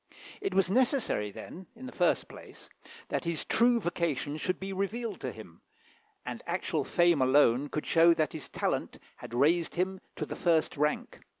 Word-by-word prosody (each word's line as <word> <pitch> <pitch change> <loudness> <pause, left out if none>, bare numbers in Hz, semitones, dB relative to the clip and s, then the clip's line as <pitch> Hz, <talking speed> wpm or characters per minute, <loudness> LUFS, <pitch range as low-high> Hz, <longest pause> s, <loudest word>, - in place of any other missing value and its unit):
It 395 - -2
was 195 -2 +4
necessary, 240 - +1
then, 180 - -10
in 250 +3 -10
the 255 - -7
first - - +1
place, - - -13 0.4
that - - -2
his 170 -2 -2
true 240 +1 +4
vocation 165 - -2
should 185 +3 -2
be 195 0 -5
revealed 205 +2 -3
to 130 - -3
him, 100 -8 -13 0.6
and - - -5
actual - - -1
fame 175 -4 +3
alone 130 0 +4
could 150 - -3
show 165 +1 +5
that 155 -2 0
his 155 - -7
talent - - -2 0.2
had 120 - -8
raised 160 +6 +2
him 185 +1 -1
to - - -3
the - - -6
first 165 -3 +1
rank. 150 +1 -1
170 Hz, 175 wpm, -30 LUFS, 145-195 Hz, 0.6 s, show